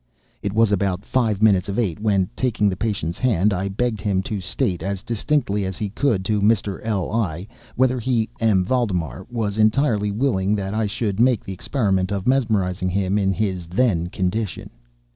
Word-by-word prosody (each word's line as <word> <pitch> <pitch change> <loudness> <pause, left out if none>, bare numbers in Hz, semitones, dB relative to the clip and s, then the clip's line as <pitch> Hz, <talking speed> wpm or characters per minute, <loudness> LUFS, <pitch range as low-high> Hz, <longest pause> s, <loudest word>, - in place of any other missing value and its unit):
It 100 - -2
wanted 110 0 +3
about 100 0 0
five 110 -5 0
minutes 100 -4 +4
of 100 - -3
eight 105 -7 0
when, 100 -4 +2
taking 120 -5 +1
the 95 - -2
patient's 90 -6 -2
hand, 105 -5 +2
I 95 +1 -1
begged 110 +2 -1
him 95 -2 0
to 100 0 -4
state, 90 -1 -1
as 95 +1 -3
distinctly 115 -3 0
as 95 -1 -4
he 105 - -3
could, 105 -3 0
to 105 +1 +1
Mr. 100 -2 +1
L—l, 100 -4 -1 0.3
whether 130 0 +2
he 115 -2 0
(M. 105 -5 +3
Valdemar) 95 - -1
was 110 -3 -2
entirely 110 -1 +2
willing 105 -3 +1
that 100 -1 -3
I 110 0 0
should 100 -1 -2
make 125 -2 +3
the 95 - -6
experiment 95 -3 0
of 100 -2 -2
mesmerizing 100 -8 +1
him 95 +2 0
in 95 -1 +2
his 95 -4 -2
then 90 -3 +1
condition. 95 +3 -3
100 Hz, 180 wpm, -22 LUFS, 95-115 Hz, 0.3 s, minutes